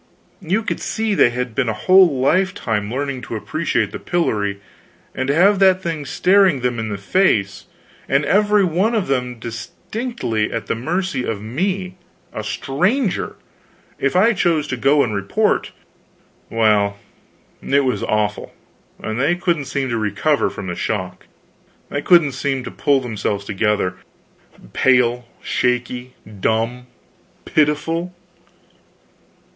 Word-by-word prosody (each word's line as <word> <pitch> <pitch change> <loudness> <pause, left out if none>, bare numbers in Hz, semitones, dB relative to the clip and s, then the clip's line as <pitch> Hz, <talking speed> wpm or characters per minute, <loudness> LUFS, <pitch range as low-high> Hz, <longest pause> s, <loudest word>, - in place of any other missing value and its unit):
You 195 +5 -1
see 220 -1 -2
they 180 - +5
had 125 0 -4
been 125 -1 0
a - - 0
whole 170 - +5
lifetime 140 - 0
learning 135 0 -3
to 115 - -6
appreciate 155 +9 -1
the - - -6
pillory; 105 - -1 0.5
and 130 - -3
to 140 - +1
have 195 +4 +4
that 190 -1 +4
thing 160 -4 -3
staring 185 -2 +3
them 120 -1 -1
in 110 -1 -3
the 100 - -3
face, 100 - +1 0.4
and 140 +2 +2
every 205 +3 +3
one 190 +7 +1
of 210 -4 +1
them 125 -2 -2
distinctly 115 - -4
at 115 - -3
the - - -1
mercy 155 +3 -2
of 110 -4 -3
me, 185 - -3 0.4
a - - -4
stranger, 190 - -1 0.6
if 140 - 0
I 220 +6 +5
chose 170 -6 +1
to 130 - -1
go 140 +4 +3
and 110 - -2
report 100 -1 0 0.8
well, 105 -3 +2 0.6
it 140 +1 +2
was 130 - 0
awful, 105 -1 -1 0.5
and 110 +2 -3
they 140 +7 +2
couldn't 170 -5 -1
seem 135 +1 -2
to 115 - -1
recover 110 +8 +1
from 100 - -7
the 90 -2 -4
shock, 95 -3 -4 0.6
they 145 - -2
couldn't 170 -3 +5
seem 135 0 -2
to 125 - -7
pull 140 -2 +1
themselves 105 -4 -3
together. 100 -3 0 0.8
Pale, 125 -2 +2 0.2
shaky, 125 +1 -1 0.2
dumb, 115 +5 -1 0.6
pitiful? 165 +4 0
135 Hz, 135 wpm, -20 LUFS, 115-175 Hz, 0.8 s, they